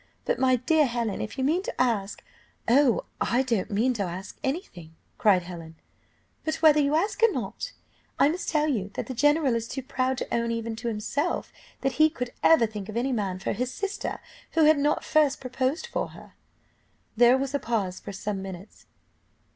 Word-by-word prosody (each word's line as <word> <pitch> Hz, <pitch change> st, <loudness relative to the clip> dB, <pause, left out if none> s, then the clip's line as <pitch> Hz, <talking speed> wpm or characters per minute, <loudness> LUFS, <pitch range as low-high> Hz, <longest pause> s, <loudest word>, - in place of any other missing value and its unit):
But, -, -, 0 dB
my 260 Hz, -1 st, +4 dB
dear 295 Hz, +5 st, +3 dB
Helen, 235 Hz, -4 st, -2 dB
if 220 Hz, -, -6 dB
you 265 Hz, -, -1 dB
mean 320 Hz, +7 st, +2 dB
to -, -, -6 dB
ask 220 Hz, -5 st, 0 dB, 0.2 s
" -, -, -37 dB
"Oh, 255 Hz, 0 st, +4 dB, 0.2 s
I 250 Hz, +3 st, +3 dB
don't 230 Hz, -7 st, -1 dB
mean 230 Hz, +5 st, +1 dB
to 220 Hz, -, -4 dB
ask 185 Hz, 0 st, -5 dB
any 280 Hz, +7 st, 0 dB
thing," 165 Hz, -, -14 dB, 0.2 s
cried 190 Hz, -4 st, +4 dB
Helen. 165 Hz, -2 st, -9 dB, 0.7 s
"But, 315 Hz, 0 st, -1 dB
whether 310 Hz, -2 st, +5 dB
you 290 Hz, +1 st, +2 dB
ask 395 Hz, +8 st, 0 dB
or 460 Hz, -1 st, +6 dB
not, -, -, -5 dB, 0.4 s
I -, -, +5 dB
must 345 Hz, +4 st, -3 dB
tell 305 Hz, -1 st, +2 dB
you 210 Hz, -9 st, -1 dB
that -, -, -3 dB
the 260 Hz, -, -5 dB
general 290 Hz, +1 st, +3 dB
is 230 Hz, 0 st, -2 dB
too 270 Hz, +2 st, -5 dB
proud 260 Hz, -1 st, -1 dB
to -, -, -4 dB
own, 235 Hz, 0 st, 0 dB
even 230 Hz, -1 st, -3 dB
to 235 Hz, +1 st, -5 dB
himself, 235 Hz, +9 st, -2 dB, 0.3 s
that 270 Hz, -, +1 dB
he 310 Hz, -, +7 dB
could; 250 Hz, -6 st, -5 dB
ever 320 Hz, -8 st, +6 dB
think 210 Hz, -2 st, -7 dB
of 215 Hz, -, -4 dB
any 260 Hz, +3 st, 0 dB
man 200 Hz, -6 st, -1 dB
for 190 Hz, -, -2 dB
his 250 Hz, +4 st, -2 dB
sister 400 Hz, +7 st, -4 dB, 0.3 s
who 325 Hz, -, +4 dB
had 305 Hz, -1 st, +6 dB
not 295 Hz, +1 st, +1 dB
first 300 Hz, -2 st, +2 dB
proposed 260 Hz, +5 st, -2 dB
for -, -, -2 dB
her." -, -, -14 dB, 0.8 s
There 240 Hz, +2 st, +6 dB
was 270 Hz, +1 st, -3 dB
a 285 Hz, -, +1 dB
pause 205 Hz, -7 st, -2 dB
for -, -, -8 dB
some 195 Hz, 0 st, -4 dB
minutes. 190 Hz, +1 st, -10 dB
250 Hz, 200 wpm, -26 LUFS, 215-290 Hz, 0.8 s, he